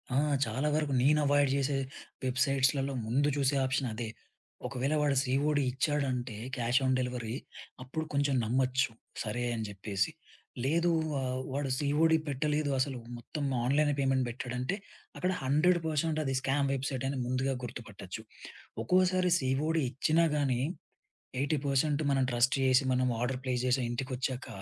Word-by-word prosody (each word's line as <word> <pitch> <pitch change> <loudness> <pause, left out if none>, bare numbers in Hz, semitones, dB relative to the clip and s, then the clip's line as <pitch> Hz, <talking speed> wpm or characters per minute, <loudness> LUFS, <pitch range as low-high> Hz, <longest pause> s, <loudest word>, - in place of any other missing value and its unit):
ఆ! - - +3 0.3
చాలా 140 +4 -1
వరకు 150 -3 0
నేను 150 +3 +5
అవాయిడ్ 145 -1 +4
చేసే 140 0 +1 0.5
వెబ్‌సైట్స్‌‌లలో 135 +1 +2
ముందు 140 +6 +2
చూసే 140 0 +2
ఆప్షన్ 130 0 0
అదే. 115 +1 -4 0.6
ఒకవేళ 135 +3 -1
వాడు 145 -2 +2
సిఒడి 145 +2 +1
ఇచ్చాడంటే 130 -3 -1 0.2
క్యాష్ 120 +2 +2
ఆన్ 130 - +3
డెలివరీ 125 -2 -3 0.5
అప్పుడు 150 +5 -3
కొంచెం 140 -1 +2
నమ్మొచ్చు. 130 +2 +1 0.3
సరే 115 +3 -2
అని 115 -1 -2
జెప్పేసి. 100 -1 -2 0.5
లేదు 170 +5 +2 0.2
వా 140 - 0 0.3
వాడు 140 0 -1
సీఓడి 150 +3 +3
పెట్టలేదు 150 +1 0
అసలు, 130 -1 -1 0.2
మొత్తం 145 +5 -5 0.2
ఆన్‌లైనే 145 +3 +3
పేమెంట్ 135 -1 +2
పెట్టాడంటే 125 +6 -3 0.4
అక్కడ 180 +1 0
100% 160 +1 +2
అది 135 - -1
స్కామ్ 140 +1 +1
వెబ్‌సైటని 135 0 -2
ముందుగా 130 +2 0
గుర్తుపట్టొచ్చు. 110 -4 -7 0.6
ఒక్కోసారి 185 +5 +3
సీఒడి 150 +5 +1
ఇచ్చినా 155 +6 +2
గానీ 130 -4 +1 0.8
80% 145 +1 +1
మనం 135 -1 +3
ట్రస్ట్ 120 +3 +3
జేసి, 130 0 +5
మనం 125 0 +2
ఆర్డర్ 125 +1 -1
ప్లేస్ 125 -1 0
జేసి, 130 +1 +2
ఇంటికొచ్చాక 130 +1 -3
135 Hz, 130 wpm, -31 LUFS, 125-145 Hz, 0.8 s, నేను